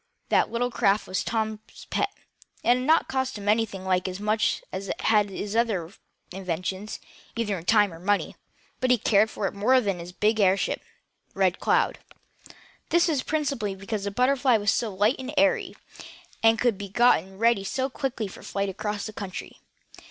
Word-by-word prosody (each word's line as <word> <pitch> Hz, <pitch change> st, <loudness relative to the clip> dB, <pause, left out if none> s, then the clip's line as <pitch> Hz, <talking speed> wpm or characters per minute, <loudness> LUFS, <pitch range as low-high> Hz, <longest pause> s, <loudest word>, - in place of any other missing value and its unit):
That -, -, +3 dB
little 245 Hz, +1 st, -1 dB
craft 210 Hz, -3 st, +2 dB
was 185 Hz, -, -2 dB
Tom's 220 Hz, -1 st, -4 dB
pet. 405 Hz, -, +1 dB, 0.5 s
It -, -, 0 dB
had 245 Hz, +1 st, +5 dB
not 320 Hz, +1 st, +4 dB
cost 265 Hz, -3 st, -2 dB
him 205 Hz, 0 st, -8 dB
anything 210 Hz, -3 st, +1 dB
like 185 Hz, 0 st, +1 dB
as 185 Hz, +1 st, -5 dB
much 215 Hz, +1 st, 0 dB
as 195 Hz, +1 st, -5 dB
had 210 Hz, -2 st, +2 dB
his 200 Hz, +2 st, -5 dB
other 205 Hz, -8 st, 0 dB, 0.4 s
inventions, 185 Hz, +2 st, -4 dB, 0.4 s
either 225 Hz, -3 st, -1 dB
in 170 Hz, -2 st, -8 dB
time 205 Hz, -3 st, +4 dB
or 165 Hz, -, -11 dB
money, 205 Hz, +3 st, 0 dB, 0.4 s
but 255 Hz, -, 0 dB
he 250 Hz, -, +5 dB
cared 215 Hz, 0 st, +3 dB
more 200 Hz, -, 0 dB
for 210 Hz, +6 st, +2 dB
it -, -, +4 dB
than 200 Hz, -5 st, -1 dB
for -, -, -10 dB
his 170 Hz, +1 st, -8 dB
big 215 Hz, +4 st, +1 dB
airship, 195 Hz, -1 st, +2 dB, 0.5 s
RED -, -, +2 dB
CLOUD. -, -, +1 dB, 0.9 s
This 345 Hz, +1 st, +4 dB
was 290 Hz, -5 st, +1 dB
principally 275 Hz, -11 st, -2 dB
because 200 Hz, +1 st, -4 dB
the -, -, 0 dB
BUTTERFLY 255 Hz, +2 st, +3 dB
was 205 Hz, -1 st, +1 dB
so 225 Hz, -2 st, -1 dB
light 205 Hz, +6 st, +2 dB
and 265 Hz, +3 st, -6 dB
airy, 290 Hz, 0 st, +2 dB, 0.7 s
and 225 Hz, 0 st, +5 dB
could 230 Hz, -3 st, +1 dB
be 200 Hz, -1 st, -6 dB
gotten 195 Hz, -4 st, +3 dB
ready 230 Hz, -2 st, +3 dB
so 260 Hz, +7 st, -1 dB
quickly 260 Hz, -4 st, -3 dB
for 190 Hz, -, -11 dB
a -, -, -14 dB
flight 200 Hz, 0 st, -2 dB
across 210 Hz, +2 st, -4 dB
country. 200 Hz, -3 st, -7 dB
210 Hz, 180 wpm, -26 LUFS, 195-240 Hz, 0.9 s, had